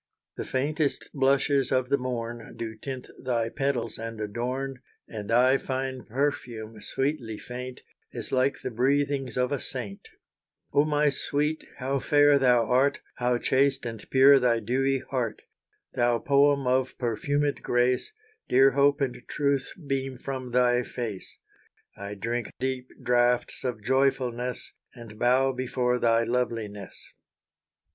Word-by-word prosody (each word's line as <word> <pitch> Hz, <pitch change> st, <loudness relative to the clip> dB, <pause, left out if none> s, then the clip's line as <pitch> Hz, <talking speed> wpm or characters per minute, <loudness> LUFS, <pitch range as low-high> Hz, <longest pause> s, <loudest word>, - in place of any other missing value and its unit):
The -, -, -5 dB
faintest 145 Hz, +2 st, -1 dB
blushes 140 Hz, 0 st, +2 dB
of 130 Hz, -1 st, +1 dB
the 140 Hz, -, +3 dB
morn 120 Hz, -2 st, -5 dB
Do 115 Hz, -1 st, -4 dB
tint 130 Hz, +3 st, -6 dB
thy 120 Hz, -3 st, -1 dB
petals 125 Hz, -4 st, -2 dB
and 115 Hz, -1 st, -6 dB
adorn, 125 Hz, +5 st, -3 dB, 0.3 s
And 105 Hz, -2 st, -7 dB
thy 130 Hz, +3 st, +4 dB
fine 130 Hz, -1 st, -3 dB
perfume, 115 Hz, -4 st, -3 dB
sweetly 135 Hz, -6 st, -2 dB
faint, 125 Hz, +2 st, -8 dB, 0.3 s
Is -, -, -7 dB
like 130 Hz, +1 st, +1 dB
the 130 Hz, -, -4 dB
breathings 135 Hz, +1 st, 0 dB
of 125 Hz, +2 st, +1 dB
a 145 Hz, -, 0 dB
saint. 110 Hz, -8 st, -6 dB, 0.6 s
Oh 145 Hz, -, +4 dB
my 150 Hz, -1 st, +2 dB
sweet! 150 Hz, +3 st, -1 dB
how 135 Hz, +1 st, -1 dB
fair 145 Hz, +1 st, +5 dB
thou 125 Hz, -3 st, +4 dB
art; 135 Hz, +4 st, +2 dB, 0.2 s
How 125 Hz, 0 st, +1 dB
chaste 135 Hz, +1 st, +1 dB
and 115 Hz, -2 st, -5 dB
pure 135 Hz, +1 st, +7 dB
thy 120 Hz, -2 st, +2 dB
dewy 130 Hz, +4 st, 0 dB
heart! 120 Hz, -5 st, -2 dB, 0.5 s
Thou 120 Hz, -1 st, +2 dB
poem 140 Hz, +2 st, +3 dB
of 130 Hz, +1 st, +1 dB
perfumed 145 Hz, +5 st, -1 dB
grace, 125 Hz, -, +1 dB, 0.4 s
Dear 135 Hz, +2 st, +6 dB
hope 140 Hz, +2 st, +3 dB
and 130 Hz, -3 st, -1 dB
truth 140 Hz, -2 st, 0 dB
beam 135 Hz, -1 st, -2 dB
from 130 Hz, -1 st, -5 dB
thy 125 Hz, 0 st, +3 dB
face. 115 Hz, -5 st, -6 dB, 0.6 s
I 100 Hz, +1 st, -7 dB
drink 115 Hz, +3 st, -3 dB
deep 130 Hz, -1 st, -2 dB
draughts 120 Hz, 0 st, +2 dB
of 125 Hz, -5 st, -3 dB
joyfulness, 125 Hz, -1 st, 0 dB, 0.2 s
And 115 Hz, -3 st, -11 dB
bow 130 Hz, +2 st, +3 dB
before 125 Hz, -1 st, -1 dB
thy 115 Hz, -1 st, +3 dB
loveliness. 115 Hz, -5 st, -3 dB
125 Hz, 135 wpm, -27 LUFS, 120-135 Hz, 0.6 s, pure